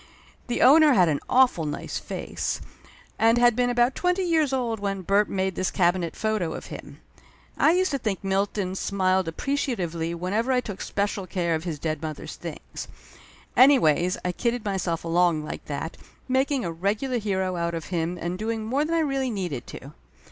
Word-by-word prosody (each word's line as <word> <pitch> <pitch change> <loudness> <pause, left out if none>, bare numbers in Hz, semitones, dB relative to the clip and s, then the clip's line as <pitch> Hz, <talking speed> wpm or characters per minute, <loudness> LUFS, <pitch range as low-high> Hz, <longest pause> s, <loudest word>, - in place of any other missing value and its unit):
The 240 - +1
owner 295 +3 +7
had 180 -7 +5
an 145 -2 0
awful 250 -11 +4
nice 145 - -4
face, - - -4 0.6
and 225 +1 +4
had 240 -1 +5
been 245 0 +2
about 245 +1 +3
twenty 360 +4 0
years 320 -5 +2
old 240 -4 -1
when 195 -1 -3
Bert 200 +3 +2
made 190 0 -1
this 185 - -1
cabinet 175 -2 +1
photo 215 -7 -1
of - - -7
him. - - -10 0.6
I 320 - +4
used 370 0 +2
to 275 - -1
think 210 -5 -2
Milton 195 0 -1
smiled 190 -2 +1
appreciatively 170 - -2
whenever 205 +9 -1
I 255 - +3
took 210 -6 -6
especial 200 -2 -2
care 175 -3 -1
of 160 +1 -2
his 165 -4 -3
dead 155 0 -3
mother's 155 -2 -6
things. - - -8 0.7
Anyways 180 - +5
I 180 - +1
kidded 235 +4 -2
myself 185 -4 -1
along 165 -2 +2
like - - -7
that, 150 +3 -5 0.3
making 265 -1 +1
a 170 - -2
regular 210 +9 -1
hero 190 -3 -1
out 170 0 -1
of 165 - -5
him 170 +1 -1
and 175 +2 -3
doing 220 0 -2
more 265 +6 +1
than 330 +2 -1
I 330 - +3
really 275 -3 0
needed 180 - -4
to. 140 +3 -10
195 Hz, 180 wpm, -25 LUFS, 175-245 Hz, 0.7 s, owner